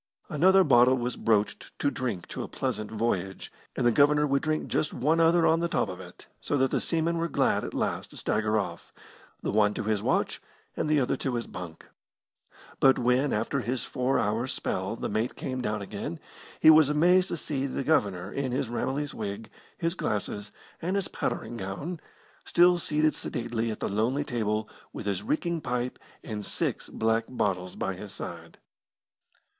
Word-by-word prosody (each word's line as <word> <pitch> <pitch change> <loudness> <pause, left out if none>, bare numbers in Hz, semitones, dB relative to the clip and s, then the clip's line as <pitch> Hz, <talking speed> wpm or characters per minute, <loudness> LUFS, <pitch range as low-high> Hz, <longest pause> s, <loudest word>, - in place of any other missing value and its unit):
Another 185 +4 +5
bottle 130 -3 +5
was 125 0 -2
broached 105 -2 0
to 140 - +1
drink 120 -9 -3
to - - -5
a - - -4
pleasant 110 -1 -3
voyage, 105 -4 -2 0.2
and 125 - 0
the 120 - +6
Governor 150 +3 +4
would 140 -1 +1
drink 155 -1 -1
just 155 - -1
one 155 +6 +2
other 165 +1 +5
on 165 - +4
the 170 - +1
top 140 - 0
of 90 - -6
it, - - -12
so 145 - -1
that 130 -1 +2
the - - +1
seamen 165 0 +1
were 165 - 0
glad - - +1
at - - -5
last - - -1
to - - -12
stagger 110 0 +1
off 85 -5 -4 0.5
the - - 0
one 105 -1 +3
to - - -2
his 105 -1 0
watch, - - 0 0.3
and - - -1
the 155 -1 +4
other 125 - +1
to 130 -3 -2
his 120 - -2
bunk. 85 -3 -9 0.9
But 135 -1 +6
when, 125 +3 +2
after 115 +6 0
his 125 +1 -2
four 125 +1 0
hours' 115 +5 0
spell, 95 +4 -2
the - - -3
mate 110 +4 -1
came 130 -1 -4
down 105 -3 -2
again, 100 -4 -5 0.4
he 160 - +9
was 155 -2 +6
amazed 180 +5 +4
to - - -2
see 140 -3 -2
the 135 - -3
Governor, 100 - +1
in 135 -2 -2
his 125 -1 -1
Ramillies 135 +4 -2
wig, 105 +1 -5 0.3
his 165 -1 0
glasses, 105 - -3 0.3
and 180 +4 -1
his 200 -2 -1
powdering 120 - -3
gown, 115 - -5 0.4
still 175 0 +5
seated 155 -1 +2
sedately 115 -1 -3
at 110 - -4
the - - 0
lonely 115 +8 0
table 110 -4 -1 0.2
with - - -7
his 100 -2 -1
reeking 165 +8 -1
pipe 125 -1 -2 0.2
and 105 -2 -5
six - - -2
black 115 0 +1
bottles 95 -7 -1
by - - -2
his - - -7
side. - - -8
125 Hz, 185 wpm, -28 LUFS, 105-150 Hz, 0.9 s, he